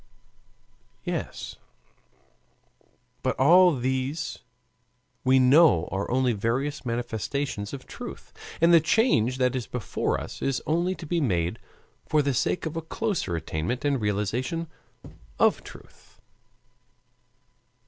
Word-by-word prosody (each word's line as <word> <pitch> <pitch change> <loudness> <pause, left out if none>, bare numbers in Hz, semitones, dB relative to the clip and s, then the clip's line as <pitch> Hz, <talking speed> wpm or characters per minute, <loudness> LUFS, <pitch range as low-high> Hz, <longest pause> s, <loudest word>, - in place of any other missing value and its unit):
Yes, - - -5 1.6
but 130 - -1
all 175 +4 +6
these 130 +4 -2 0.8
we 130 +1 +4
know 130 - +5
are 95 +1 -2
only 125 0 +2
various 125 +8 -2
manifestations 120 -1 -3
of 140 -2 -8
truth, - - -9 0.3
and 170 +1 +5
the 170 - +9
change 150 - +2
that 125 -1 +1
is 125 -3 -3
before 125 -5 -2
us - - -8
is 135 -2 0
only 175 +4 0
to 170 - -9
be 170 +2 0
made 90 - 0 0.5
for 150 -1 +2
the 140 -1 0
sake 150 - 0
of 160 0 -4
a 165 - -2
closer 170 - -2
attainment 80 - -3
and 140 -4 +1
realization 110 - -1 0.7
of - - +3
truth. - - -15
130 Hz, 115 wpm, -26 LUFS, 115-160 Hz, 1.6 s, the